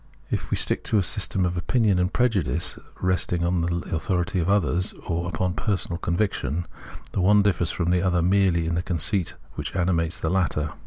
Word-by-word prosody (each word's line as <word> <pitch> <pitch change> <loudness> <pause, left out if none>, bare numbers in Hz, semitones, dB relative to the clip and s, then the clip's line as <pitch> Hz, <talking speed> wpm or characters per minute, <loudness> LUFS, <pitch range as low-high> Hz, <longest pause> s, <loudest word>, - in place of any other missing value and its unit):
If - - -2
we - - 0
stick - - 0
to 110 - +2
a 100 - +3
system 95 0 0
of 90 0 -1
opinion 100 +2 +2
and 90 +1 +1
prejudice 100 - 0 0.2
resting 90 -1 +1
on 90 0 +1
the 85 +1 -2
authority 90 +2 -1
of 85 +2 0
others, 90 -1 +2
or 85 0 -2
upon 90 +2 -1
personal 85 0 -2
conviction, 85 -4 -1 0.5
the 95 - -1
one 100 +2 +5
differs 90 -4 +1
from 85 -1 -1
the 90 -1 +2
other 90 -2 +1
merely 90 -2 +3
in 80 - -1
the 85 - 0
conceit 90 +1 0 0.2
which - - -6
animates 85 -2 0
the 80 - -1
latter. 85 -5 0
90 Hz, 190 wpm, -25 LUFS, 85-95 Hz, 0.5 s, one